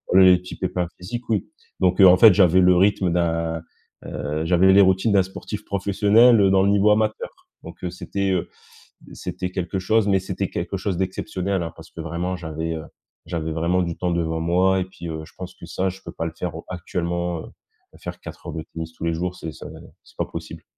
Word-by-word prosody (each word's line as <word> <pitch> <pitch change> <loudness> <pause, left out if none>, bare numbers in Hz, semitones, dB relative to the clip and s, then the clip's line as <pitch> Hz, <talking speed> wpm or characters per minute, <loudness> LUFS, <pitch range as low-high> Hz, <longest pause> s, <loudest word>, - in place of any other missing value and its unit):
les 95 -1 +8
petits 90 - -10
pépins 90 -1 -2
physiques, 120 +7 -7
oui. 105 -4 +1 0.3
Donc 90 +1 +3
heu, 95 - +10
en 90 0 +7
fait, 110 -1 +8
j'avais 95 -2 +5
le 90 0 +5
rythme 95 -1 +3
d'un, 85 -1 0 0.4
heu, 75 +2 -3
j'avais 90 +2 +5
les 100 - +7
routines 95 +3 +3
d'un 95 -2 +5
sportif 105 +3 -7
professionnel 100 +2 +4
dans 95 0 +4
le 100 - +3
niveau 100 +1 +4
amateur. 110 0 0 0.3
Donc - - -11
heu, 90 - -2
c'était, 100 +2 -2
heu, 90 -2 -1 0.6
c'était 90 0 -5
quelque 90 +1 -3
chose, 105 +2 +2
mais 95 -1 +4
c'était 95 +1 -3
quelque 90 +3 -4
chose 95 -1 -2
d'exceptionnel, 95 0 -2
hein, 80 - -5
parce - - -13
que 85 - -9
vraiment 85 +3 -3
j'avais, 80 -1 -4
heu, 80 - -6 0.4
j'avais 80 -1 -3
vraiment 85 +3 +1
du 85 -1 -3
temps 90 -1 -1
devant 80 -1 -1
moi 95 +3 +2
et - - -1
puis, 85 -2 -9
heu, 80 -1 -5
je - - -18
pense 90 0 -8
que 85 - -12
ça, 95 +3 -1
je 95 +1 -11
peux 85 - -7
pas 80 - -4
le 80 - -4
faire 90 -3 -3
au 80 - -8
actuellement, 85 -1 -3
heu, - - -11 0.5
faire - - -6
4 - - -10
heures - - -5
de 80 - -4
tennis 80 0 -5
tous - - -7
les 85 - +1
jours 90 +2 -3
c'est 80 - -6
c'est - - -10 0.4
c'est - - -21
pas - - +1
possible. - - -8
90 Hz, 220 wpm, -23 LUFS, 85-95 Hz, 0.6 s, heu